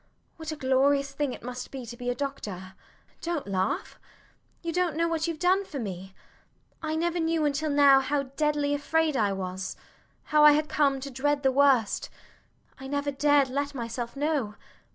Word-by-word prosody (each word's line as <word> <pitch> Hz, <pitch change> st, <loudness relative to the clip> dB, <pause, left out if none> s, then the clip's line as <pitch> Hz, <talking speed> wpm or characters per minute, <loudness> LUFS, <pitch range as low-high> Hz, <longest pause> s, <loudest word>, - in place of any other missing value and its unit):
What 320 Hz, -1 st, -5 dB
a -, -, -4 dB
glorious 275 Hz, 0 st, +2 dB
thing 275 Hz, -1 st, -2 dB
it -, -, -9 dB
must 250 Hz, +1 st, -6 dB
be 265 Hz, -3 st, -7 dB
to 235 Hz, +1 st, -8 dB
be 245 Hz, 0 st, -4 dB
a 245 Hz, -, 0 dB
doctor! 205 Hz, -10 st, -5 dB, 0.5 s
[They 340 Hz, 0 st, -2 dB
laugh]. 305 Hz, -, -2 dB
Dont -, -, -18 dB
laugh. 190 Hz, 0 st, -2 dB, 0.6 s
You 335 Hz, -1 st, -3 dB
dont 355 Hz, -3 st, 0 dB
know 335 Hz, +1 st, +1 dB
what 330 Hz, 0 st, -1 dB
youve 330 Hz, -2 st, -3 dB
done 370 Hz, +4 st, +2 dB
for 325 Hz, -7 st, -8 dB
me. 190 Hz, -5 st, -6 dB, 0.7 s
I 315 Hz, -1 st, -2 dB
never 345 Hz, +2 st, 0 dB
knew 325 Hz, -1 st, +1 dB
until 295 Hz, +2 st, 0 dB
now 285 Hz, -2 st, +6 dB
how 275 Hz, +1 st, 0 dB
deadly 295 Hz, -1 st, +1 dB
afraid 310 Hz, +1 st, +1 dB
I 210 Hz, -5 st, +2 dB
was 190 Hz, 0 st, -4 dB, 0.5 s
how 300 Hz, 0 st, +3 dB
I 300 Hz, 0 st, +9 dB
had 305 Hz, +1 st, +1 dB
come 280 Hz, -3 st, +2 dB
to 275 Hz, +1 st, -6 dB
dread 285 Hz, +2 st, 0 dB
the 265 Hz, -, +4 dB
worst. 265 Hz, -5 st, +3 dB, 0.7 s
I 265 Hz, -, -7 dB
never 285 Hz, +1 st, -1 dB
dared 285 Hz, -1 st, +3 dB
let 280 Hz, +2 st, -2 dB
myself 235 Hz, 0 st, -4 dB
know. 280 Hz, -7 st, -1 dB
280 Hz, 190 wpm, -27 LUFS, 250-305 Hz, 0.7 s, I